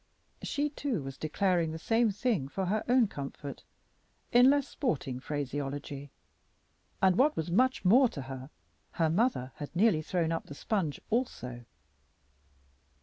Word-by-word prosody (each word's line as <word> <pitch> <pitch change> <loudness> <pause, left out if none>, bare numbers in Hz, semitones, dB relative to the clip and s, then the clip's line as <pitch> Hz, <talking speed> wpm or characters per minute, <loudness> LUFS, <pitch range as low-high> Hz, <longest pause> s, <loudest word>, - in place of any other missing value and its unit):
She, 290 +1 -1
too, 275 - -2
was 135 0 -6
declaring 170 +2 +1
the 160 - -5
same 225 +7 +2
thing 205 - 0
for 190 +7 -3
her 210 +4 0
own 250 -2 +5
comfort 140 -3 -7 0.7
in 245 +1 +7
less 285 -1 +3
sporting 140 - -2
phraseology, 145 0 -4 0.9
and, 190 -1 +5
what 295 +3 +4
was 160 +2 -2
much 255 +4 +2
more 245 +7 +6
to 140 - -6
her, 130 0 -8 0.4
her 160 -2 +1
mother 170 - +1
had 145 +2 -7
nearly 190 -4 +4
thrown 165 +1 -1
up 165 - -3
the 145 - -8
sponge 175 -5 -1
also. 125 - -2
170 Hz, 145 wpm, -30 LUFS, 145-235 Hz, 0.9 s, in